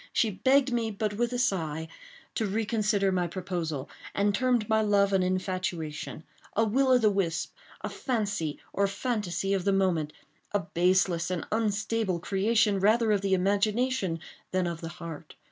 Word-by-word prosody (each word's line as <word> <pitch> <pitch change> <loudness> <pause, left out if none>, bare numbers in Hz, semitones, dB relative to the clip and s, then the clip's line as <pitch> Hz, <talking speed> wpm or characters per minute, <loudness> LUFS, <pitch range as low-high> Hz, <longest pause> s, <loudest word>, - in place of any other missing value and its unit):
She 225 - +2
begged 260 +5 +3
me, 230 -2 0
but 210 0 -2
with 240 +3 0
a 245 - -1
sigh, 160 -9 -1 0.5
to 220 - -1
reconsider 210 -1 +1
my 180 -2 +1
proposal, 170 -6 -3 0.3
and 200 +1 +2
termed 245 -1 +1
my 220 0 +3
love 200 -2 +3
an 190 - +4
infatuation—a 185 0 -3
will 260 +6 +2
o' 255 -1 +6
the 220 -4 +3
wisp—a 170 -4 -3
fancy 200 - -2 0.2
or 200 0 +2
fantasy 200 -3 -1
of 190 -2 0
the 200 - +2
moment—a 185 +1 -1
baseless 175 0 +1
and 180 -2 -2
unstable 215 -2 0
creation 205 +3 +2
rather 220 +3 +3
of 205 -2 +2
the 195 -1 +2
imagination 205 0 +1 0.3
than 185 -1 0
of 170 -1 -4
the 165 - -5
heart. 165 -2 -8
200 Hz, 150 wpm, -28 LUFS, 180-220 Hz, 0.5 s, o